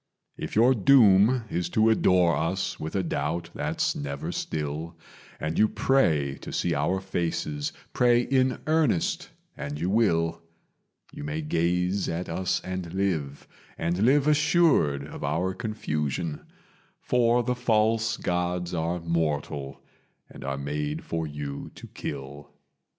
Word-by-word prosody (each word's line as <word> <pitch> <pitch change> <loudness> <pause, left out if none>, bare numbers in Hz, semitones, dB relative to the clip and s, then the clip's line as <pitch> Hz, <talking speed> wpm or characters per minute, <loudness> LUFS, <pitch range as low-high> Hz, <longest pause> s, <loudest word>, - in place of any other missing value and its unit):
"If - - -6
your 120 +5 +6
doom 115 0 +5
is 85 0 -1
to 110 +4 +3
adore 90 -5 +4
us 95 +3 -2
with 80 - -5
a 95 - +1
doubt 85 0 -2
that's - - -1
never 70 -1 -4
still, 80 +2 -4 0.4
And 80 +1 -2
you 110 - +6
pray 80 - +1
to - - -8
see - - 0
our 95 - 0
faces 85 -6 -2 0.2
pray 120 -1 +4
in 130 0 +2
earnest, 155 - +1 0.3
and 75 0 -5
you 90 +4 -1
will. 85 -7 +2 0.7
You - - -7
may 75 +2 -3
gaze 90 +5 0
at 85 +2 -3
us 90 +2 -1
and 90 -2 -5
live, 80 -8 -2 0.3
and 85 +2 -1
live 135 +6 +4
assured 150 - +3
of 75 - -8
our 95 +3 0
confusion: 80 - -3 0.5
For 120 0 +2
the 125 - 0
False 110 -2 +1
Gods 90 0 -2
are 85 +1 -1
mortal, 75 -4 -2 0.5
and - - -10
are 70 0 -3
made 75 +2 -3
for 80 -1 -3
you 75 -1 -6
to - - -10
kill. 70 +1 -7
85 Hz, 135 wpm, -26 LUFS, 75-110 Hz, 0.7 s, your